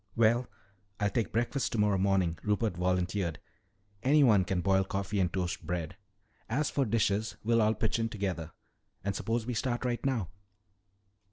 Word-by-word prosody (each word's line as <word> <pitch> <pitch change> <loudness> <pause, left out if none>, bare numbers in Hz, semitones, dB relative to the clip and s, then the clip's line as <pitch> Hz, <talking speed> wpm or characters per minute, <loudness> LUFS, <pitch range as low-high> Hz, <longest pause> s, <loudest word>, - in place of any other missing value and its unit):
"Well, 115 +2 +3 0.5
I'll 105 -1 +1
take 115 -2 -1
breakfast 120 +3 0
tomorrow 105 -3 +2
morning," 95 -4 +1
Rupert 105 -1 0
volunteered. 90 -1 0 0.6
"Anyone 130 -9 +5
can 90 0 -1
boil 95 +1 +3
coffee 100 +1 -2
and 90 -3 +2
toast 90 -1 -2
bread. 85 -3 -3 0.5
As 145 +7 0
for 140 - +1
dishes, 110 -1 0
we'll 115 +1 +3
all 110 +1 +3
pitch 110 +1 0
in 115 0 0
together. 95 -6 -3 0.5
And 100 0 -1
suppose 115 +2 -1
we 125 - -2
start 120 +2 -1
right 120 -2 -1
now." 120 -10 0
105 Hz, 155 wpm, -30 LUFS, 95-115 Hz, 0.6 s, Anyone